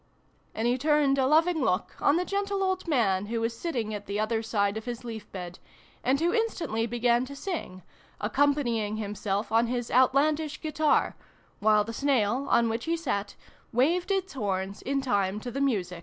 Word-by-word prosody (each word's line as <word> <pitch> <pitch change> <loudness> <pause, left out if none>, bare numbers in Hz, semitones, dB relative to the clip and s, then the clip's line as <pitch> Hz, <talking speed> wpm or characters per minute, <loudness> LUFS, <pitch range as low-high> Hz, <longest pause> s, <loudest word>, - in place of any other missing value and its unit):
And 225 +2 0
he 245 +2 +1
turned 290 -1 +3
a 260 - +3
loving 320 +2 +3
look 190 -6 0
on 285 - +4
the 360 +1 +1
gentle 400 0 -1
old 375 -1 -1
man 205 - +1
who 230 +1 -2
was 230 +1 -1
sitting 235 -7 -3
at 205 -1 -6
the 200 +1 -2
other 220 +1 0
side 205 -2 0
of 220 - -5
his 240 -1 -5
leaf 225 -3 -7
bed, 180 -2 -7 0.4
and 265 +2 +2
who 340 +2 +1
instantly 330 - -1
began 240 +1 +2
to 280 +2 -9
sing, 275 - -5 0.4
accompanying 235 -3 +1
himself 205 -1 -3
on 230 +1 +3
his 245 0 -3
Outlandish 290 +4 +2
guitar, 310 0 +1 0.4
while 210 0 +4
the 230 +2 -6
snail, 260 -1 +1
on 235 - +4
which 225 +1 -2
he 335 +1 0
sat, 205 -11 -3 0.4
waved 325 - +2
its 385 -1 -1
horns 195 -5 -3
in 275 +1 -1
time 200 -6 0
to 245 +3 -6
the 275 +3 -3
music. 190 -10 0
240 Hz, 185 wpm, -28 LUFS, 210-295 Hz, 0.4 s, on